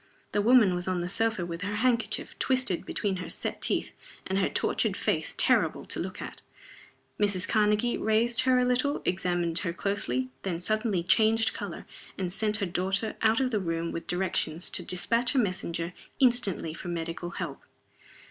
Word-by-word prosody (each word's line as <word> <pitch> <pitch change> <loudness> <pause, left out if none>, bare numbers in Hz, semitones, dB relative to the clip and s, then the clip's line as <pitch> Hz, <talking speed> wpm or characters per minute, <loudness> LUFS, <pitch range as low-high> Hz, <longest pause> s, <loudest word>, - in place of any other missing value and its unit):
The 205 - +1
woman 225 -3 +6
was 180 +1 -3
on 185 -1 0
the 175 - -2
sofa 220 -1 0
with 170 0 -6
her 205 +1 -2
handkerchief 235 +1 0
twisted 255 -9 +1
between 195 -2 -1
her 180 - -6
set - - -4
teeth, - - 0 0.3
and 190 +1 0
her 190 - +2
tortured - - 0
face - - -1
terrible - - +2
to - - -3
look - - -5
at. - - -8 0.8
Mrs. 200 -3 +1
Karnegie 215 +2 +2
raised 225 +2 +2
her 255 0 +3
a 250 - +3
little, 255 +4 +1
examined 175 -2 0
her 170 - -2
closely 130 -11 0
then 175 -4 -3
suddenly 215 -1 0
changed 220 +4 +3
color, - - -6 0.3
and 180 -2 -2
sent 215 +1 +1
her 205 - -1
daughter 190 +4 -1
out 220 0 +4
of 260 -1 +1
the 215 - +1
room 165 -2 -2
with 165 0 -6
directions 180 -2 -1
to - - +1
dispatch 230 +8 0
a - - +3
messenger 180 -6 -1 0.3
instantly 240 -11 +2
for 175 - -8
medical 170 0 -4
help. 170 -5 -5
195 Hz, 175 wpm, -28 LUFS, 175-225 Hz, 0.8 s, woman